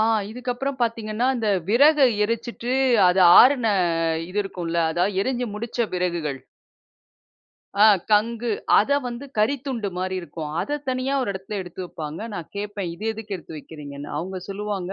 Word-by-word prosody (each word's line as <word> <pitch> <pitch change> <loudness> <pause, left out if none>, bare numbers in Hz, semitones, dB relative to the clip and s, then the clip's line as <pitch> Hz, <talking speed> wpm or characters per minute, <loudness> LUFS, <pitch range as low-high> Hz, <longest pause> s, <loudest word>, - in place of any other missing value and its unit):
ஆ - - +4 0.3
இதுக்கப்புறம் 250 +3 -4
பாத்தீங்கன்னா, 230 +1 -1
இந்த 225 -3 -1 0.2
விறக 285 +3 +6 0.2
எரிச்சுட்டு 235 +2 -3 0.4
அது 180 +1 +4 0.2
ஆறுன 250 -2 +5 0.6
இது 205 +3 -1
இருக்கும்ல்ல. 170 -3 -3 0.2
அதாவது 190 +2 0
எரிஞ்சு 250 +1 -1
முடிச்ச 235 0 -2
விறகுகள். 170 -6 -2 1.4
அ - - +9 0.3
கங்கு, 230 +3 +2 0.3
அதை 280 +7 +3
வந்து 240 +3 -6
கரித்துண்டு 245 -2 0
மாரி 185 0 -2
இருக்கும். 160 -3 -7
அத 295 0 -2
தனியா 255 +2 -1
ஒரு 240 - -1
இடத்துல 190 +2 -6
எடுத்து 180 +1 -10
வைப்பாங்க. 155 -1 -7
நான் 170 - -7
கேட்பேன் 205 -3 -4
இது 210 - -9
எதுக்கு 215 -2 -6
எடுத்து 165 -2 -11
வைக்கிறீங்கன்னு. 145 -2 -9
அவங்க 185 +2 -4
சொல்லுவாங்க, 195 -2 -4
210 Hz, 140 wpm, -23 LUFS, 180-245 Hz, 1.4 s, அ